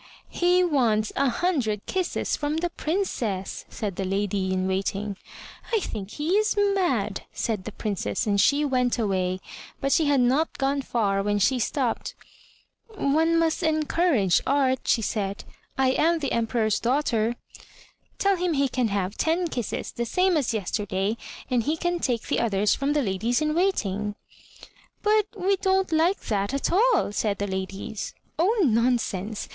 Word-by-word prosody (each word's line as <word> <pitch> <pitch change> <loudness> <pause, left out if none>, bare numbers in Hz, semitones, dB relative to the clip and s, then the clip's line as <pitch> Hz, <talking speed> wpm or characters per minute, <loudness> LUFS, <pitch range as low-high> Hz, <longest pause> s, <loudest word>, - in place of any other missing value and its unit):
"He 360 +1 +3
wants 235 -10 +1
a 275 -1 +2
hundred 240 - -1
kisses 370 -2 -1
from 295 +1 -2
the 345 +1 -1
Princess!" 255 - -2
said 205 -5 -4
the 195 - -1
lady 195 0 -1
in 185 0 0
waiting. 195 +2 -2 0.6
"I 450 - +3
think 210 - -5
he 300 +2 -3
is 430 0 +1
mad!" 355 - +1
said 215 -5 -2
the 215 - -5
Princess, 195 - -2
and 200 -2 +2
she 285 +8 +3
went 250 -3 +1
away, 185 -4 0 0.4
but 275 - -1
she 320 - +4
had 285 -2 +3
not 265 +6 +1
gone 275 +1 0
far 205 -6 0
when 205 +1 0
she 250 +6 +2
stopped. 245 +1 -1 0.8
"One 320 +1 +2
must 330 +1 +1
encourage 310 - +2
art," 265 -2 +2
she 225 - +2
said; 200 -1 -2 0.3
"I 265 -1 +3
am 330 +5 +2
the 285 -4 -3
Emperor's 225 -2 +1
daughter. 240 -3 +1 0.8
Tell 395 -1 +2
him 355 -1 0
he 275 -2 +1
can 250 -2 0
have 200 -1 -2
ten 335 +2 +1
kisses, 240 -7 -4
the 235 - -3
same 365 +6 +2
as 280 -6 +1
yester 210 -1 -2
day, 195 +4 0 0.3
and 250 -2 +1
he 300 +7 -1
can 350 +1 -1
take 245 -7 -1
the - - -1
others 210 -2 +2
from 280 +1 0
the 295 -1 +1
ladies 220 +5 0
in 305 0 0
waiting." 210 - 0 0.9
"But 425 0 +3
we 390 +1 +1
don't 380 0 +1
like 330 +5 +2
that 200 +3 -1
at 275 - -1
all," 425 - +3
said 205 -1 -1
the 200 - -2
ladies. 195 +2 -5 0.2
"Oh 415 +6 +3
nonsense! 225 -3 0
250 Hz, 160 wpm, -25 LUFS, 205-320 Hz, 0.9 s, she